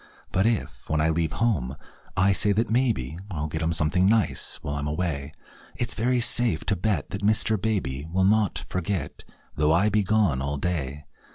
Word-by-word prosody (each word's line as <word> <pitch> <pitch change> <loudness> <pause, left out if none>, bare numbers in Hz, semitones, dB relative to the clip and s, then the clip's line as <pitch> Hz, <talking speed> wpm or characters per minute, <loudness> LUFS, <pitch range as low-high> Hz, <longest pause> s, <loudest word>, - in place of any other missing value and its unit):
But 95 +4 +2
if, 115 -2 -3
when 80 - +1
I 80 +1 +2
leave 80 -1 0
home, 85 - 0 0.4
I 95 +1 +4
say 100 +2 +3
that 110 +2 0
maybe 110 - 0
I'll 80 -6 -3
get 80 +1 -4
him 80 +1 0
something 90 +4 +2
nice 110 -1 +1
while 70 - -3
I'm 70 0 -3
away, 75 -3 -2 0.4
It's 120 -1 -1
very 125 +2 +1
safe 120 0 +2
to 100 - +1
bet 95 -4 -1
that 100 - -4
Mr. 110 +1 +3
Baby 80 -10 -2
Will 95 +2 +1
not 100 -5 +2
forget, 90 -4 -3 0.3
though 75 +1 +2
I 90 +6 +4
be 105 +1 +2
gone 100 -9 +2
all 70 +1 -2
day. 75 -3 -3
90 Hz, 185 wpm, -25 LUFS, 75-105 Hz, 0.4 s, I